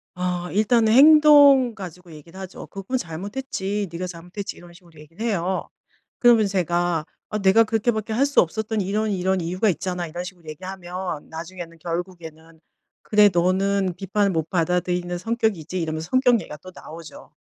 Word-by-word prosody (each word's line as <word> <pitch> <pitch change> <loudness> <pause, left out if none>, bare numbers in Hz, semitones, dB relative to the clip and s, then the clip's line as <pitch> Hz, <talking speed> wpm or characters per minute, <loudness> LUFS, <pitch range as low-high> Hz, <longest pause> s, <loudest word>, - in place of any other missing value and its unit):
아 180 -1 -3
일단은 220 +2 +3
행동 285 -3 +7
가지고 180 -3 -10
얘기를 165 +4 -13
하죠. 190 -1 -9
"그건 195 +6 -4
잘못했지. 200 +2 -4
네가 180 +2 -4
잘못했지." 180 +3 -8
이런 175 0 -14
식으로 170 -3 -18
얘기를 165 +9 -8
해요. 190 -4 -2 0.5
그러면 235 -4 +5
제가 175 -4 0 0.2
"아 215 - -2
내가 195 +3 +5
그렇게 225 +2 0
밖에 220 0 -4
할 265 +5 +2
수 285 - +4
없었던 215 +4 -2
이런 210 +3 -1
이런 190 -1 0
이유가 185 +6 0
있잖아." 180 -1 -3
이런 175 +3 -6
식으로 180 -3 -11
얘기하면 180 0 -6
나중에는 170 +1 -8
결국에는 165 -2 -7 0.4
"그래. 210 -1 +5
너는 190 +2 +1
비판을 200 +1 0
못 160 -2 -2
받아들이는 180 0 -1
성격이지." 185 -5 -2
이러면서 160 +1 -4
성격 255 -2 +3
얘기가 150 - -9
또 185 +4 -13
나오죠. 165 0 -12
185 Hz, 380 characters per minute, -23 LUFS, 170-215 Hz, 0.5 s, 행동